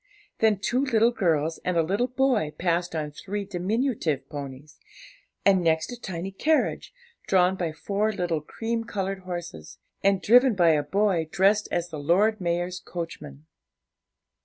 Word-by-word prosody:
Then 220 -2 +3
two 245 +7 0
little 235 -3 +3
girls 165 -7 0
and 180 -1 0
a 165 - +4
little 200 +9 0
boy 255 - +1
passed 175 -1 0
on 150 -2 -3
three 200 +6 -5
diminutive 185 - -1
ponies, 140 0 -8 0.7
and 190 -2 +4
next 160 +4 +1
a - - -5
tiny 185 -1 -5
carriage, 310 - 0 0.4
drawn 185 0 +3
by 175 -4 -2
four 200 +7 -1
little 175 -6 -2
cream 225 +8 -3
coloured 195 -4 -3
horses, 170 - -7 0.3
and 195 -1 +3
driven 245 +3 +5
by 175 -3 +4
a 150 -2 +2
boy 175 0 0
dressed 200 +3 +3
as 175 0 -1
the 155 -3 -6
Lord 195 +8 +2
Mayor's 175 +1 -1
coachman. 165 - -8
180 Hz, 150 wpm, -26 LUFS, 160-210 Hz, 0.7 s, driven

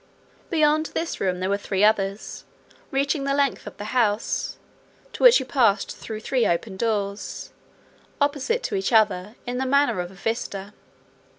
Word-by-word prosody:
Beyond 310 -2 +3
this 335 - -2
room 180 -2 0
there 185 - -1
were 200 0 +1
three 200 -1 -1
others, 200 -1 +1 0.5
reaching 275 +1 0
the 275 0 0
length 280 -2 0
of - - -9
the - - -6
house, 225 -4 0 0.6
to - - -8
which - - +8
you 265 - -4
passed 230 -7 +2
through 220 -1 -7
three 250 +1 +1
doors, 200 0 -3 0.7
opposite 290 - 0
to 420 - -2
each 385 -7 -1
other, 210 -2 +2
in 250 0 -3
the 265 - 0
manner 280 -6 +3
of 175 0 -3
a 190 - -15
vista. 205 -1 -4
230 Hz, 160 wpm, -24 LUFS, 200-280 Hz, 0.7 s, which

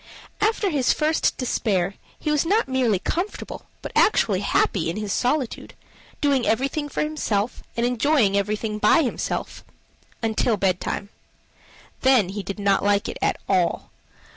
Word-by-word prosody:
After 420 -2 +1
his 275 -5 +2
first 310 +1 +1
despair, 195 -7 0 0.2
he 305 - -2
was 300 -1 +2
not 410 +7 +2
merely 255 -6 +2
comfortable, 350 - -4 0.2
but - - -5
actually 205 - +3
happy 190 -3 +1
in 170 - -3
his 210 -2 -2
solitude, 255 0 -1 0.5
doing 280 -4 +2
everything 275 +6 0
for - - -1
himself, 245 -8 -2 0.2
and 235 - +1
enjoying 245 -3 +2
everything 210 +1 -1
by 230 +10 +5
himself 250 - -3 0.6
until 225 0 +1
bedtime. 190 +1 -1 0.9
Then 255 -8 +4
he 205 +2 -4
did 200 0 -6
not 200 -1 +2
like 205 0 +2
it - - -6
at - - +1
all. 180 -4 0
230 Hz, 140 wpm, -23 LUFS, 200-290 Hz, 0.9 s, by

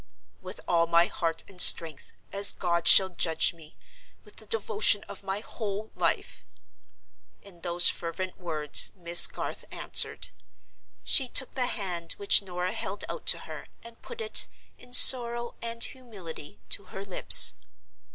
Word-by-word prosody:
"With 185 0 -11
all 170 -1 -1
my 170 +1 +1
heart 165 -4 -5
and 180 -2 -3
strength—as 165 +5 +3
God 170 -2 -4
shall 190 -1 +7
judge 165 -3 -2
me, 160 -2 -20 0.5
with - - -17
the - - -13
devotion 445 - +1
of - - -14
my 195 +1 -7
whole 215 -1 -9
life!" - - -5 1.0
In 175 -4 -18
those 175 0 +3
fervent 180 +2 -6
words 155 -4 0
Miss 170 -1 +5
Garth - - -9
answered. - - -2 0.7
She 265 - +3
took 260 +1 -1
the 255 -2 -4
hand 175 -7 -6
which 200 0 +1
Norah 180 -1 -7
held 200 +2 -7
out - - -10
to - - +1
her, - - -13 0.2
and 235 0 -17
put 475 -1 -12
it, 440 -1 0 0.3
in 245 - -19
sorrow 240 -2 +5
and 230 0 -3
humility, 195 - -8
to 200 - -5
her 195 +1 -12
lips. 190 - +5
190 Hz, 145 wpm, -24 LUFS, 170-230 Hz, 1.0 s, shall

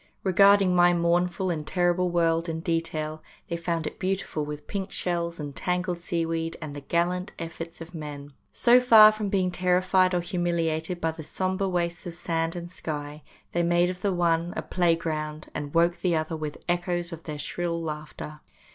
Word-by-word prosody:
Re 190 - 0
garding 195 -1 +6
my 175 0 +5
mournful 175 +2 +1
and 160 -3 -2
terrible 180 0 +2
world 165 -1 +1
in 160 0 -3
detail, 160 -2 -2 0.3
they 170 - -1
found 170 -1 -2
it - - -6
beautiful 185 -5 -1
with 150 0 -6
pink 195 +2 -4
shells 170 -1 -2
and 145 -2 -6
tangled 180 0 -1
seaweed 165 -1 -2
and 150 -3 -7
the 145 - -6
gallant 175 +5 -1
efforts 165 0 -7
of 165 +2 -9
men. 145 -3 -7 0.2
So 245 +1 +5
far 220 -3 +9
from 215 -1 -3
being 190 -2 +1
terrified 185 +1 +3
or 175 - +1
humiliated 170 -1 -1
by 165 -1 0
the 160 0 -9
sombre 185 +5 -1
wastes 175 -1 -2
of 170 - -6
sand 165 -1 -1
and 175 0 -6
sky, 150 -3 -5 0.3
they 175 - +1
made 175 +1 +3
of 180 0 -10
the 200 - +1
one 170 -1 +1
a - - -2
playing 175 -2 +2
ground, 155 -2 -4
and 145 -1 -4
woke 170 +2 +2
the 175 -3 +2
other 155 +1 -1
with 155 -2 -5
echoes 175 0 -1
of 165 0 -9
their 150 -2 -5
shrill 170 +2 -2
laughter. 150 -1 -6
170 Hz, 185 wpm, -26 LUFS, 160-180 Hz, 0.3 s, far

